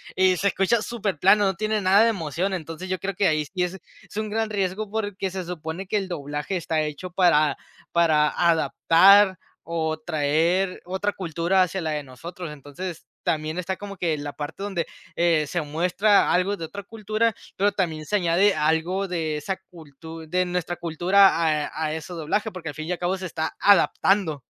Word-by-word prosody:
y 185 Hz, -1 st, +4 dB
se 200 Hz, -, +1 dB
escucha 200 Hz, +4 st, +2 dB
superplano, 205 Hz, -3 st, +2 dB
no 190 Hz, -, +1 dB
tiene 215 Hz, +3 st, -1 dB
nada 195 Hz, +3 st, +5 dB
de 230 Hz, -, +4 dB
emoción, 185 Hz, 0 st, -2 dB
entonces 170 Hz, +1 st, -6 dB
yo 185 Hz, -1 st, -1 dB
creo 195 Hz, 0 st, -4 dB
que 195 Hz, +1 st, +2 dB
ahí 155 Hz, -1 st, 0 dB
sí 180 Hz, +4 st, -2 dB
es 180 Hz, +2 st, -3 dB, 0.3 s
es -, -, -10 dB
un 215 Hz, 0 st, -2 dB
gran 220 Hz, +1 st, -1 dB
riesgo, 200 Hz, +1 st, -2 dB
porque 205 Hz, -3 st, -3 dB
se 190 Hz, -1 st, -4 dB
supone 170 Hz, +2 st, -6 dB
que 210 Hz, -, 0 dB
el 195 Hz, -2 st, -2 dB
doblaje 150 Hz, +3 st, -3 dB
está 160 Hz, -2 st, -1 dB
hecho 155 Hz, +4 st, -5 dB
para 160 Hz, -5 st, +3 dB, 0.4 s
para 155 Hz, -3 st, +4 dB
adaptar 185 Hz, +3 st, +5 dB, 0.3 s
o 160 Hz, -1 st, -2 dB
traer 160 Hz, +4 st, 0 dB
otra 190 Hz, +3 st, -1 dB
cultura 175 Hz, +1 st, 0 dB
hacia 185 Hz, +1 st, 0 dB
la 160 Hz, -, -2 dB
de 150 Hz, -1 st, -2 dB
nosotros. 165 Hz, +6 st, -8 dB
Entonces, 150 Hz, +5 st, -8 dB, 0.2 s
también 155 Hz, +2 st, -1 dB
está 190 Hz, +1 st, -3 dB
como 200 Hz, -1 st, -8 dB
que 165 Hz, -3 st, 0 dB
la 145 Hz, 0 st, -6 dB
parte 150 Hz, +6 st, -6 dB
donde 190 Hz, -5 st, -2 dB, 0.3 s
eh, 165 Hz, -3 st, +2 dB
se 175 Hz, +2 st, -2 dB
muestra 180 Hz, +7 st, +2 dB
algo 185 Hz, +3 st, +2 dB
de 165 Hz, -, -5 dB
otra 200 Hz, +5 st, -8 dB
cultura, 215 Hz, +1 st, -1 dB, 0.2 s
pero 205 Hz, +2 st, +3 dB
también 160 Hz, -6 st, -2 dB
se 210 Hz, -, -1 dB
añade 190 Hz, +2 st, +3 dB
algo 160 Hz, +6 st, 0 dB
de 160 Hz, -4 st, -2 dB
esa 190 Hz, +6 st, -3 dB
cultu 160 Hz, 0 st, -11 dB
de 180 Hz, +3 st, +1 dB
nuestra 175 Hz, -1 st, -2 dB
cultura 175 Hz, +4 st, +4 dB, 0.4 s
a 160 Hz, -, -4 dB
a 155 Hz, -, -2 dB
ese 160 Hz, +3 st, -6 dB
doblaje, 175 Hz, +7 st, -1 dB
porque 170 Hz, -5 st, -7 dB
al 145 Hz, -, -7 dB
fin 155 Hz, +2 st, -6 dB
y 180 Hz, -, -1 dB
al -, -, -4 dB
cabo 180 Hz, +2 st, 0 dB
se 190 Hz, -, -6 dB
está 160 Hz, -1 st, -4 dB
adaptando. 195 Hz, -5 st, +3 dB
180 Hz, 190 wpm, -24 LUFS, 160-195 Hz, 0.4 s, nada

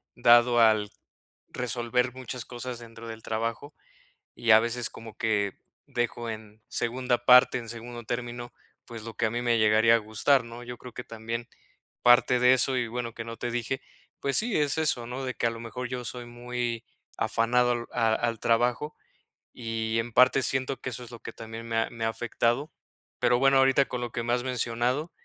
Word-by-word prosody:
dado 120 Hz, 0 st, +5 dB
al 110 Hz, -2 st, +4 dB, 0.6 s
resolver 125 Hz, 0 st, -1 dB
muchas 125 Hz, -1 st, -6 dB
cosas 120 Hz, 0 st, -6 dB
dentro 115 Hz, -1 st, -11 dB
del 110 Hz, 0 st, -8 dB
trabajo, 115 Hz, +6 st, -3 dB, 0.6 s
y 115 Hz, -, +1 dB
a 110 Hz, 0 st, +8 dB
veces 120 Hz, 0 st, -1 dB
como 115 Hz, -1 st, -11 dB
que 105 Hz, -3 st, 0 dB, 0.3 s
dejo 120 Hz, -1 st, -2 dB
en 110 Hz, -1 st, -8 dB
segunda 120 Hz, 0 st, -1 dB
parte, 125 Hz, +1 st, +7 dB
en 120 Hz, -2 st, -7 dB
segundo 120 Hz, +1 st, -7 dB
término, 120 Hz, +1 st, -5 dB, 0.3 s
pues, 115 Hz, -2 st, -9 dB
lo 115 Hz, 0 st, -7 dB
que -, -, 0 dB
a -, -, +2 dB
mí 120 Hz, +2 st, -2 dB
me 120 Hz, -1 st, +2 dB
llegaría 110 Hz, +2 st, +5 dB
a -, -, +4 dB
gustar, 115 Hz, +4 st, +2 dB
¿no? 115 Hz, +1 st, -9 dB
Yo 120 Hz, 0 st, -7 dB
creo 125 Hz, 0 st, -11 dB
que 125 Hz, -, -6 dB
también 115 Hz, +1 st, -6 dB, 0.5 s
parte 120 Hz, 0 st, +5 dB
de 125 Hz, +1 st, +6 dB
eso 130 Hz, 0 st, +2 dB
y 120 Hz, -2 st, 0 dB
bueno, 120 Hz, 0 st, -4 dB
que 115 Hz, -1 st, -7 dB
no 115 Hz, 0 st, -6 dB
te 120 Hz, -, -4 dB
dije, 120 Hz, +2 st, -2 dB, 0.4 s
pues 140 Hz, -1 st, -1 dB
sí, 230 Hz, 0 st, +1 dB
es 145 Hz, -1 st, +1 dB
eso, 140 Hz, -6 st, +1 dB
¿no? 130 Hz, +2 st, -5 dB
De 130 Hz, -, -3 dB
que -, -, -2 dB
a -, -, +2 dB
lo 115 Hz, -, -8 dB
mejor 125 Hz, +2 st, -5 dB
yo 125 Hz, -1 st, -4 dB
soy 120 Hz, +1 st, -5 dB
muy 120 Hz, -1 st, -4 dB, 0.3 s
afanado 125 Hz, +2 st, +2 dB
al 120 Hz, -1 st, -2 dB
a 115 Hz, -1 st, +2 dB
al 115 Hz, -1 st, -1 dB
trabajo 120 Hz, +7 st, +1 dB, 0.6 s
y 115 Hz, -1 st, -2 dB
en 115 Hz, 0 st, -4 dB
parte 130 Hz, +2 st, +5 dB
siento 130 Hz, +1 st, 0 dB
que -, -, -4 dB
eso 125 Hz, -, -5 dB
es 120 Hz, -, -12 dB
lo 120 Hz, -, -9 dB
que -, -, -8 dB
también 115 Hz, 0 st, -8 dB
me 115 Hz, -, -3 dB
ha 115 Hz, -, +1 dB
me 115 Hz, -1 st, -4 dB
ha 115 Hz, -, +2 dB
afectado. 120 Hz, +5 st, -1 dB, 0.5 s
Pero 120 Hz, -, +3 dB
bueno, 135 Hz, +1 st, +5 dB
ahorita 135 Hz, +1 st, +4 dB
con 125 Hz, -, -3 dB
lo 120 Hz, -2 st, -4 dB
que 120 Hz, -, -2 dB
me 120 Hz, -, -1 dB
has 125 Hz, -, 0 dB
mencionado, 125 Hz, +5 st, -1 dB
120 Hz, 200 wpm, -27 LUFS, 115-125 Hz, 0.6 s, a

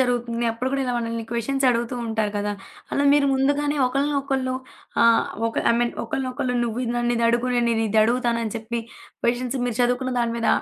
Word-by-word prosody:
జరుగుతుంది. 240 Hz, -2 st, 0 dB
అప్పుడు 250 Hz, +3 st, -2 dB
కూడా 275 Hz, 0 st, 0 dB
ఇలా 250 Hz, -, -1 dB
మనల్ని 230 Hz, -1 st, -3 dB
క్వెషన్స్ 265 Hz, +3 st, 0 dB
అడుగుతూ 235 Hz, +1 st, -1 dB
ఉంటారు 215 Hz, -2 st, -1 dB
కదా! 205 Hz, 0 st, -1 dB, 0.4 s
అలా 285 Hz, -, +1 dB
మీరు 290 Hz, -1 st, +4 dB
ముందుగానే 290 Hz, +2 st, +1 dB
ఒకళ్ళనొకళ్ళు 275 Hz, -1 st, 0 dB, 0.5 s
ఆహ్, 230 Hz, 0 st, +4 dB, 0.2 s
ఒక -, -, -8 dB, 0.2 s
ఐ -, -, +2 dB
మీన్ 240 Hz, -, +1 dB
ఒకరినొకళ్ళు 255 Hz, 0 st, -2 dB
నువ్వు 235 Hz, +1 st, -3 dB
ఇది 235 Hz, -, -2 dB
నన్ను 240 Hz, 0 st, +1 dB
ఇదడుగు, 235 Hz, +1 st, +2 dB
నేను 240 Hz, 0 st, +2 dB
నిన్ను 225 Hz, 0 st, +1 dB
ఇదడుగుతానని 230 Hz, 0 st, +2 dB
చెప్పి, 230 Hz, +1 st, -3 dB, 0.4 s
క్వెషన్స్ 245 Hz, +2 st, 0 dB
మీరు 240 Hz, 0 st, -3 dB
చదువుకున్న 250 Hz, +1 st, 0 dB
దాని 235 Hz, 0 st, 0 dB
మీద, 230 Hz, -, 0 dB
240 Hz, 175 wpm, -23 LUFS, 230-260 Hz, 0.5 s, మీరు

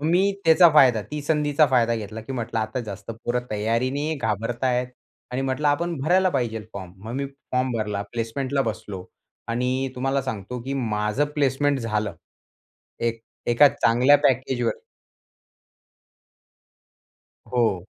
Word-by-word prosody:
मग 150 Hz, -, -2 dB
मी 195 Hz, +3 st, +3 dB
त्याचा 165 Hz, +2 st, +7 dB
फायदा 125 Hz, -7 st, +6 dB
ती 150 Hz, 0 st, -3 dB
संधीचा 150 Hz, 0 st, +3 dB
फायदा 115 Hz, -2 st, +3 dB
घेतला 110 Hz, +1 st, -6 dB
की 125 Hz, +5 st, -7 dB
म्हंटलं 120 Hz, -2 st, -3 dB
आता 110 Hz, +4 st, -2 dB
जास्त 100 Hz, +2 st, -7 dB
पोरं 125 Hz, +1 st, 0 dB
तयारीने 125 Hz, +8 st, 0 dB
घाबरतायेत 120 Hz, +4 st, -1 dB, 0.4 s
आणि 130 Hz, +2 st, -1 dB
म्हंटलं 135 Hz, +3 st, 0 dB
आपण 170 Hz, +3 st, 0 dB
भरायला 185 Hz, +6 st, +3 dB
पाहिजे 120 Hz, -6 st, -1 dB
फॉर्म. 95 Hz, -3 st, -8 dB
मग 115 Hz, -, -5 dB
मी 140 Hz, +1 st, -2 dB
फॉर्म 130 Hz, -2 st, -3 dB
भरला 105 Hz, -2 st, -2 dB
प्लेसमेंटला 130 Hz, +4 st, -1 dB
बसलो 105 Hz, -5 st, -5 dB, 0.4 s
आणि 125 Hz, +3 st, 0 dB
तुम्हाला 135 Hz, +2 st, 0 dB
सांगतो 125 Hz, -1 st, -5 dB
की 135 Hz, +2 st, -4 dB
माझं 105 Hz, +1 st, 0 dB
प्लेसमेंट 140 Hz, 0 st, +1 dB
झालं. 105 Hz, -4 st, -2 dB, 0.9 s
एक 115 Hz, -1 st, -1 dB, 0.3 s
एका 120 Hz, +5 st, +6 dB
चांगल्या 125 Hz, +5 st, +4 dB
पॅकेजवर. 130 Hz, -2 st, +1 dB, 2.8 s
हो. 110 Hz, -7 st, +1 dB
125 Hz, 130 wpm, -24 LUFS, 110-140 Hz, 2.8 s, त्याचा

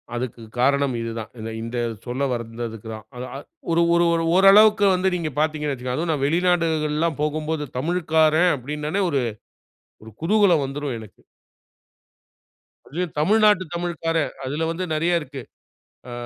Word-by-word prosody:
அதுக்கு 120 Hz, -1 st, -4 dB, 0.2 s
காரணம் 140 Hz, +1 st, +2 dB
இது 115 Hz, 0 st, -4 dB
தான். 110 Hz, -, -7 dB
இந்த 110 Hz, +1 st, -5 dB
இந்த 115 Hz, +2 st, -5 dB, 0.3 s
சொல்லவந்ததுக்கு 120 Hz, -3 st, -4 dB
தான். 110 Hz, 0 st, -11 dB
அத 125 Hz, -, -6 dB
அ -, -, -4 dB, 0.3 s
ஒரு 165 Hz, +1 st, +3 dB
ஒரு 170 Hz, 0 st, +4 dB
ஒரு 165 Hz, 0 st, +1 dB
ஓரளவுக்கு 205 Hz, +2 st, +7 dB
வந்து 185 Hz, +1 st, +1 dB
நீங்க 165 Hz, -3 st, -2 dB
பார்த்தீங்கணு 150 Hz, -1 st, 0 dB
வைச்சுக்கங்களேன், 125 Hz, -1 st, -4 dB
அதுவும் 165 Hz, 0 st, 0 dB
நான் 140 Hz, -3 st, -2 dB
வெளிநாடுகள்ல்லாம் 165 Hz, -2 st, +1 dB
போகும்போது 155 Hz, 0 st, -2 dB
தமிழ்க்காரன் 160 Hz, +2 st, +2 dB
அப்படின்னாலே 150 Hz, +7 st, -3 dB
ஒரு 140 Hz, -4 st, +1 dB, 1.0 s
குதூகலம் 185 Hz, -4 st, +3 dB
வந்துரும் 135 Hz, -1 st, -4 dB
எனக்கு! 110 Hz, -3 st, -14 dB, 1.7 s
அதுவே 175 Hz, +6 st, -2 dB
தமிழ்நாட்டு 210 Hz, +3 st, +4 dB
தமிழ்க்காரன், 165 Hz, -2 st, -1 dB
அதில 150 Hz, +5 st, -2 dB
வந்து 180 Hz, +3 st, -3 dB
நிறையா 165 Hz, +3 st, +1 dB
இருக்கு. 140 Hz, -2 st, -8 dB, 0.7 s
அ -, -, -8 dB
155 Hz, 135 wpm, -23 LUFS, 135-170 Hz, 1.7 s, ஓரளவுக்கு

